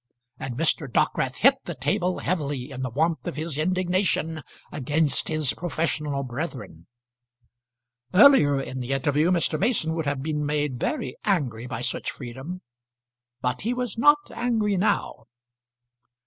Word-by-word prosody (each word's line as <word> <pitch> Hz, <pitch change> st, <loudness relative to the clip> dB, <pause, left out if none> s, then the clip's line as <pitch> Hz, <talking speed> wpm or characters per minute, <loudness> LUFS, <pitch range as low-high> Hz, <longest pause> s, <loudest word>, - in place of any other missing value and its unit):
And 125 Hz, -2 st, -5 dB
Mr. 150 Hz, -3 st, +2 dB
Dockwrath 130 Hz, +2 st, +1 dB
hit 270 Hz, +3 st, +5 dB
the 175 Hz, -, -5 dB
table 180 Hz, +7 st, 0 dB
heavily 145 Hz, -6 st, -2 dB
in 130 Hz, -1 st, -6 dB
the 130 Hz, -, -2 dB
warmth 160 Hz, +7 st, 0 dB
of -, -, -3 dB
his 155 Hz, -1 st, -3 dB
indignation 180 Hz, -2 st, 0 dB, 0.3 s
against 145 Hz, +1 st, +1 dB
his 155 Hz, -4 st, +1 dB
professional 150 Hz, -4 st, -2 dB
brethren. 125 Hz, -, -6 dB, 1.2 s
Earlier 180 Hz, -, +6 dB
in 130 Hz, -1 st, -5 dB
the 125 Hz, +2 st, -2 dB
interview 145 Hz, +4 st, +2 dB
Mr. 165 Hz, -3 st, +1 dB
Mason 195 Hz, -7 st, +1 dB
would 160 Hz, -2 st, -2 dB
have 140 Hz, -1 st, -1 dB
been 150 Hz, -1 st, -2 dB
made 145 Hz, -3 st, -1 dB
very 295 Hz, -, -2 dB
angry 130 Hz, -, -1 dB
by 120 Hz, -2 st, -5 dB
such -, -, -1 dB
freedom, 135 Hz, +8 st, -7 dB, 0.8 s
but 125 Hz, 0 st, -1 dB
he 235 Hz, +4 st, -1 dB
was 245 Hz, -3 st, -3 dB
not 295 Hz, +6 st, +6 dB, 0.2 s
angry 220 Hz, -4 st, 0 dB
now. 185 Hz, -, 0 dB
155 Hz, 140 wpm, -25 LUFS, 135-180 Hz, 1.2 s, Earlier